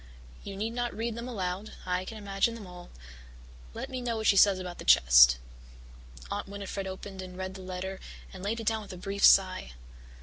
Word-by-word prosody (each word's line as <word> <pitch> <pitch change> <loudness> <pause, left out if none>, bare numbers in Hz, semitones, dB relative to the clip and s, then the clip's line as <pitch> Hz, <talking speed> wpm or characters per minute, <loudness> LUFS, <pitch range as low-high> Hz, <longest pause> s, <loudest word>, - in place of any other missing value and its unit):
You 200 - -7
need 215 +3 -2
not 240 -1 -3
read 230 +1 -2
them 235 +2 -6
aloud 195 -3 -4
I 180 0 -1
can 220 - -7
imagine 200 +2 0
them 220 -3 -9
all. 180 -1 -11 0.9
Let - - -5
me 260 -2 -5
know 235 -2 -2
what 220 - -4
she 200 - +5
says 195 0 +6
about 180 -1 -7
the - - -6
chest." 60 0 +7 0.9
Aunt - - -3
Winnifred 200 -1 -5
opened 190 0 -7
and 185 -1 -9
read 185 0 -4
the 190 - -9
letter 185 +1 -5 0.3
and 190 - -9
laid 215 +4 -2
it 225 - -6
down 220 0 +1
with 200 -2 -10
a - - -8
brief 195 +2 -4
sigh. 185 - +5
195 Hz, 205 wpm, -29 LUFS, 185-220 Hz, 0.9 s, chest